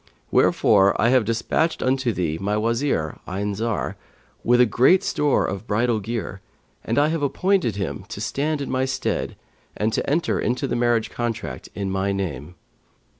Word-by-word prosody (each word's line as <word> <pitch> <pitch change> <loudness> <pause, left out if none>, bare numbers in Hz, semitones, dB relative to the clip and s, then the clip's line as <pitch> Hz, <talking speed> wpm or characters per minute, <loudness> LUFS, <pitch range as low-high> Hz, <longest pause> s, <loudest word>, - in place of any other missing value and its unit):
Wherefore 100 -2 +4
I 115 - +4
have 125 -3 +4
despatched 115 +9 0
unto 130 -1 +1
thee 85 -5 -2
my 105 +2 0
Wazir 115 - -1
Ayn 100 +3 -2
Zar, 110 +2 -2 0.5
with 120 -2 +4
great 175 - +5
store 150 -6 +1
of 100 +3 -5
bridal 110 +2 +1
gear, 100 -3 -5 0.4
and 115 - -2
I 145 +1 +4
have 165 -1 -1
appointed 175 - +1
him 100 -3 -4
to - - -6
stand 150 +1 -1
in 140 - -4
my 130 0 +1
stead 130 - -2 0.4
and 110 +1 0
to - - -1
enter 160 +4 +1
into 125 +5 -1
the - - -2
marriage 120 -2 +1
contract 120 -2 -4
in 100 -2 -3
my 95 +1 0
name. 90 -5 -4
115 Hz, 165 wpm, -23 LUFS, 100-130 Hz, 0.5 s, great